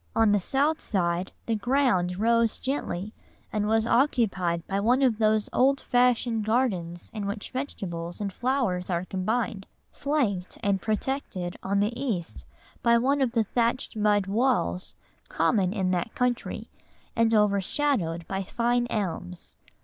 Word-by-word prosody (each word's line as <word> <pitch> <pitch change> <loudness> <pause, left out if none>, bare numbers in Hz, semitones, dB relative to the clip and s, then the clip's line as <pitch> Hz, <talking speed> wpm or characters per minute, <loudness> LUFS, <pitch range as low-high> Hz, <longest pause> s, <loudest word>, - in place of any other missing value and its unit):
On 225 -2 +4
the 205 - +4
south 285 - +1
side, 175 -2 -1
the 230 - 0
ground 220 -6 +1
rose 230 +1 +2
gently, 215 -7 -3 0.4
and 210 -1 0
was 220 0 +2
occupied 215 - +1
by 195 0 -1
one 245 +6 +3
of 235 -4 +2
those 215 -1 +2
old 270 +2 +3
fashioned 245 -2 +2
gardens 200 -7 -1
in 210 -3 -4
which 205 +1 -5
vegetables 175 -11 -5
and 200 -2 -3
flowers 240 -9 -1
are 175 0 -1
combined, 205 +2 -2 0.2
flanked 240 -11 -1
and 200 -2 +1
protected 215 -5 -2
on 200 +1 0
the 210 +3 0
east 215 -10 -3 0.4
by 235 0 +4
one 275 +4 +2
of 250 -3 +1
the 230 -2 +3
thatched 235 +4 -1
mud 210 -2 +2
walls 200 - 0 0.3
common 180 +3 +2
in 190 -3 0
that 180 +4 -2
country, 250 -1 -2 0.4
and 230 0 +3
overshadowed 200 - +1
by 195 0 -2
fine 240 +5 0
elms. 165 - -4
215 Hz, 140 wpm, -27 LUFS, 185-245 Hz, 0.4 s, On